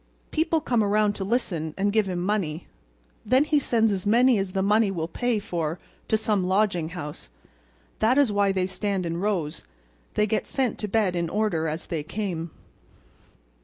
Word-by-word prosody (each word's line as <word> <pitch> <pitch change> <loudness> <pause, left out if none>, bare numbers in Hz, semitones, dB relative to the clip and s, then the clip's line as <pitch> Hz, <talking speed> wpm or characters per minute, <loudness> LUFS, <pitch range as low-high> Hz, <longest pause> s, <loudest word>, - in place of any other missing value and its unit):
People 320 0 +1
come 240 -6 +1
around 210 0 +2
to 195 - -4
listen 180 -8 -1
and 200 +1 +1
give 215 -3 +2
him 180 - -2
money. 175 -4 -1 0.6
Then 255 +6 +4
he 300 -1 +2
sends 225 -5 +2
as 190 -2 -2
many 240 +1 +5
as 195 -1 -3
the 190 -1 0
money 210 +1 +3
will 165 -4 -2
pay 240 +6 -1
for 170 -5 -3 0.3
to 220 - +2
some 210 -3 0
lodging 185 -3 +1
house. 150 - -7 0.7
That 230 +5 +3
is 280 -6 +4
why 200 -1 +2
they 190 -1 0
stand 190 0 -2
in 165 0 -2
rows; 175 -6 -2 0.5
they 210 - +3
get 215 +1 -1
sent 260 -4 -1
to 210 - -2
bed 205 -3 +1
in 170 -1 -1
order 205 -6 0
as 155 +2 -3
they 165 -3 -3
come." 170 -1 -4
200 Hz, 180 wpm, -25 LUFS, 175-220 Hz, 0.7 s, many